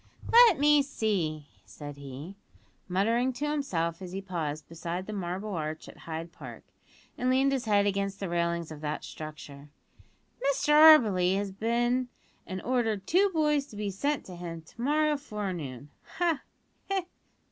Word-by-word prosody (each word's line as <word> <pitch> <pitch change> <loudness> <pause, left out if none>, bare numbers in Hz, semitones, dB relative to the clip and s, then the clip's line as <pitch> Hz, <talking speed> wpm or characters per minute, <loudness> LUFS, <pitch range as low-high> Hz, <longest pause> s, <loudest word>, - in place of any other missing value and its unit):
"Let 465 -6 +8
me 295 0 +5
see," 185 - -1 0.2
said 145 -1 -9
he, 140 +6 -8 0.5
muttering 230 +8 +1
to 290 +4 -3
himself 180 - -1
as 180 -1 -7
he 195 - -3
paused 160 -6 -4
beside 170 +2 -5
the 215 - -6
Marble 190 +2 -4
Arch 155 -2 -4
at - - -11
Hyde 165 +1 -5
Park, - - -10 0.6
and 250 - +1
leaned 265 +2 +3
his 265 -2 -1
head 205 -2 +3
against 195 0 -1
the 195 - -3
railings 170 -1 -1
of 150 -1 -9
that 150 0 -3
structure; 150 -2 -9 0.7
"Mr 280 +1 +1
Auberly 225 - +7
has 200 0 -2
been 240 +5 0 0.4
an' 185 0 -5
ordered 225 -6 0
two 385 - +4
boys 300 -4 +1
to 215 - -13
be 205 -1 -3
sent 285 +9 -1
to 180 - -9
him 170 -2 -7
to 165 - -12
morrow 300 +3 +2
forenoon 175 - -5 0.3
ha! 335 -4 +1 0.5
he! 385 -2 0
200 Hz, 160 wpm, -29 LUFS, 170-265 Hz, 0.7 s, Let